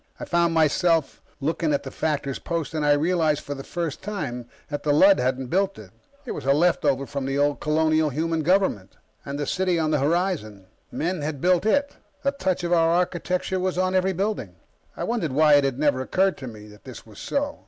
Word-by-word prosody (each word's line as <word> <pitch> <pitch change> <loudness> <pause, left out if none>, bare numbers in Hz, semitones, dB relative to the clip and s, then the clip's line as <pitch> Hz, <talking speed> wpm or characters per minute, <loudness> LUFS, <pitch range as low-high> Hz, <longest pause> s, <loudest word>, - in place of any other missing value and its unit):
I - - -5
found 170 -1 +1
myself 160 0 +2 0.2
looking 160 +2 -1
at - - -3
the 135 - -7
factor's 140 -3 -2
post, 165 -2 -3
and 155 -1 -1
I 145 0 +4
realized 155 0 +1
for 145 - -5
the 135 -1 -8
first 170 -3 -4
time 145 - -5 0.2
that 145 -1 -4
the 150 - 0
Lud 190 +7 +6
hadn't 130 0 -1
built 195 +1 +1
it. - - -12 0.3
It - - -5
was - - -5
a 135 +1 +3
leftover 145 -4 +2
from 140 -1 -4
the 135 +1 -1
old 145 0 +1
colonial 155 0 +2
human 160 +3 -1
government. 165 - 0 0.3
And 140 0 -5
the 145 - -2
city 185 +1 0
on 155 -1 0
the 150 - +2
horizon 145 - -1 0.3
men 175 +1 -2
had 145 -1 -3
built 180 +5 +2
it; 285 +5 +1 0.3
the 275 - +2
touch 190 -11 -2
of 175 0 0
our 165 -1 +4
architecture 180 +2 0
was 185 0 -1
on 185 0 +1
every 190 0 +2
building. 190 - -3 0.4
I - - -3
wondered 200 - -2
why 150 +1 +5
it 145 -1 +6
had 135 -2 -1
never 145 -3 +1
occurred 190 +8 +1
to 130 - -7
me 105 -3 -10
that 105 0 -16
this 130 -3 -11
was 110 -2 -14
so. 285 +1 -2
160 Hz, 215 wpm, -24 LUFS, 140-180 Hz, 0.4 s, Lud